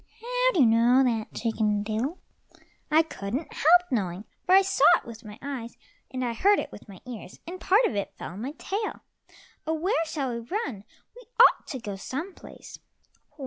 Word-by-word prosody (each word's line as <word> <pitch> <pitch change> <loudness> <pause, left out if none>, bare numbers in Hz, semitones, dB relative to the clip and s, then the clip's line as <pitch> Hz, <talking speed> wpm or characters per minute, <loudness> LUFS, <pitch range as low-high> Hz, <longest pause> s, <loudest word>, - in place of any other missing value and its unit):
"How - - +1
do 325 - +3
you - - +7
know 235 +3 +5
that, 230 -4 -1
Chicken 215 -3 0
diddle?" 225 - -2 0.7
"I 315 +1 +5
couldn't 260 0 -5
help 350 +4 +5
knowing, 195 -4 -2 0.2
for 370 - +6
I 390 - +7
saw 385 - 0
it - - -13
with 230 0 -10
my 210 -1 -10
eyes, 260 -5 -6 0.3
and 255 -1 -3
I 235 - -1
heard 400 - +4
it - - -4
with - - -13
my 190 -2 -12
ears, 235 -7 -9
and 360 +2 -8
part 415 +6 +4
of 225 - -1
it 200 - -3
fell - - -7
on 190 +4 -8
my 270 +5 -4
tail. 410 +6 -4 0.7
Oh, 320 - +1
where 345 +3 0
shall 285 -5 -3
we 235 - -3
run? 235 - -4 0.3
We - - -12 0.2
ought - - +6
to 265 - -5
go 205 -4 -6
some 300 - -5
place." - - -12
255 Hz, 195 wpm, -26 LUFS, 220-350 Hz, 0.7 s, you